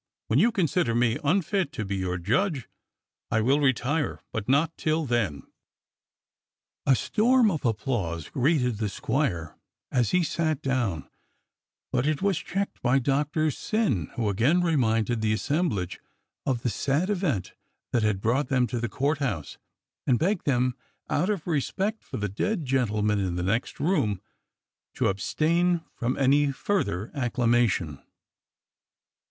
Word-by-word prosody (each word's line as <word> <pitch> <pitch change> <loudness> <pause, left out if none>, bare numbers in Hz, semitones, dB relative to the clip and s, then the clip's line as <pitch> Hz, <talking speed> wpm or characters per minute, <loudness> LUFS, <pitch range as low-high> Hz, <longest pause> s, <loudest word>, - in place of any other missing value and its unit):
When - - +3
you 235 - +4
consider 175 - +1
me 120 -1 +2
unfit 185 +1 +1
to 110 - -3
be 100 0 -2
your 90 -1 -2
judge 130 - 0 0.6
I 110 - +2
will 135 +6 +3
retire, 140 +2 0
but 110 +1 -4
not 150 +5 +3
till 155 0 0
then.'* 115 - -1 1.4
A 135 - +6
storm 230 - +3
of 160 - -3
applause 105 -8 -1
greeted 125 -5 +1
the 110 -2 -1
squire 95 - -1 0.4
as 120 -3 +2
he 180 -1 +3
sat 155 -2 0
down, 120 - -1 0.8
but 125 +2 +1
it 155 -2 +1
was 195 -3 +1
cheeked 200 +2 -3
by 125 +3 +3
Doctor 145 +4 +1
Syn, 165 - 0
who 115 -3 -1
again 120 - +3
reminded 120 -8 +1
the 110 -1 +2
assemblage 110 - -1 0.5
of 125 -2 0
the 120 - +1
sad 150 - 0
event 160 - -1 0.4
that 120 - +2
had 105 -3 +1
brought 125 +7 +1
them 130 -3 +2
to 120 0 -3
the 120 0 -2
Court 140 +7 0
House 100 - -3 0.5
and 125 - +4
begged 180 - 0
them 125 -2 +2 0.4
out 175 +7 +1
of 200 -6 -1
respect 190 - -1
for - - -6
the 105 - -1
dead 160 - -2
gentleman 105 -5 +1
in 95 -3 -1
the 90 - -2
next 105 +6 -1
room 145 - +1 0.8
to - - +2
abstain 165 - +1
from 125 +2 -2
any 140 +1 +3
further 115 - -1
acclamation. 120 - +1
130 Hz, 145 wpm, -26 LUFS, 110-160 Hz, 1.4 s, A